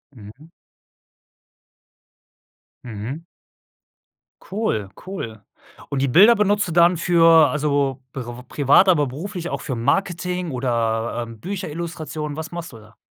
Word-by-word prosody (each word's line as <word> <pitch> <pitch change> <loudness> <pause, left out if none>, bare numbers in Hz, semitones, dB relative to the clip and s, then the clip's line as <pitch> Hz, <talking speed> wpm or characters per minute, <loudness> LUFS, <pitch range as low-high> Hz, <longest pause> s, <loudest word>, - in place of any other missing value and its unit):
Mhm. 120 +10 -14 2.3
Mhm. 120 +7 -6 1.2
Cool, 185 - -2 0.2
cool. 115 - -6 0.5
Und 140 -2 -2
die 140 - +2
Bilder 205 - +7
benutzt 205 -1 +1
du - - -4
dann 170 +1 +4
für 165 -2 +5
also, 140 -3 0
priv 130 -3 -6 0.2
privat, 145 +7 +4
aber 150 -6 +3
beruflich 175 +6 -6
auch - - -4
für 130 - -4
Marketing 180 +6 -1
oder, 115 -2 -1
ähm, 115 -2 -11
Bücherillustration. 160 - -5
Was 160 +1 -6
machst 170 -5 -7
du - - -10
da? 110 +1 -18
150 Hz, 120 wpm, -21 LUFS, 125-175 Hz, 2.3 s, Bilder